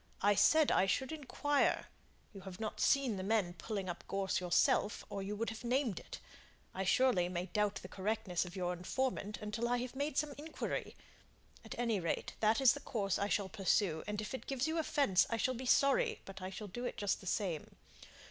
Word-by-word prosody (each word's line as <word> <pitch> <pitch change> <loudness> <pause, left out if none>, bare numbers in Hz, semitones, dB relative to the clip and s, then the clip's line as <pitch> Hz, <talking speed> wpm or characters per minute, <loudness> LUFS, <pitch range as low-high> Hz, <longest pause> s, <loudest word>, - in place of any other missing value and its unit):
I 205 +1 +6
said 310 +9 +5
I 190 - +4
should 265 +8 0
inquire. 290 -1 +1 0.5
You 195 - -9
have 190 -1 -9
not 220 -1 -4
seen 265 -7 +3
the 185 - -3
men 200 -4 +1
pulling 200 0 -4
up 175 -1 -5
gorse 195 -1 0
yourself, 180 +3 +2
or 200 - -3
you 200 +2 -3
would 225 +2 -2
have 220 +2 -8
named 245 -4 0
it. - - -9 0.6
I, 190 - -2
surely, 190 -3 +3
may 180 0 -2
doubt 205 +2 0
the - - -6
correctness 195 -2 -1
of 180 -1 -9
your 180 -1 -1
information 210 +3 -2
until 210 +3 -2
I 245 - +2
have 250 +1 -4
made 285 +1 -2
some 295 0 +1
inquiry; 315 +2 -4 0.7
at - - -8
any 230 -4 +1
rate, 170 -2 -2
that 220 +2 +3
is 265 -3 +6
the 285 - -6
course 210 -8 -1
I 200 - +1
shall 200 -2 +1
pursue, 190 -3 +1
and 210 0 -2
if 215 - -6
it 260 - -6
gives 270 -2 0
you 320 +1 0
offence, 280 - +3
I 230 - 0
shall 255 +3 +1
be 255 +1 -5
sorry, 275 +2 +3
but 195 0 -9
I 185 - -4
shall 200 +2 -7
do 240 +6 -6
it 245 - -3
just 205 -1 0
the 190 - -10
same. 180 -6 -2
210 Hz, 210 wpm, -35 LUFS, 190-255 Hz, 0.7 s, I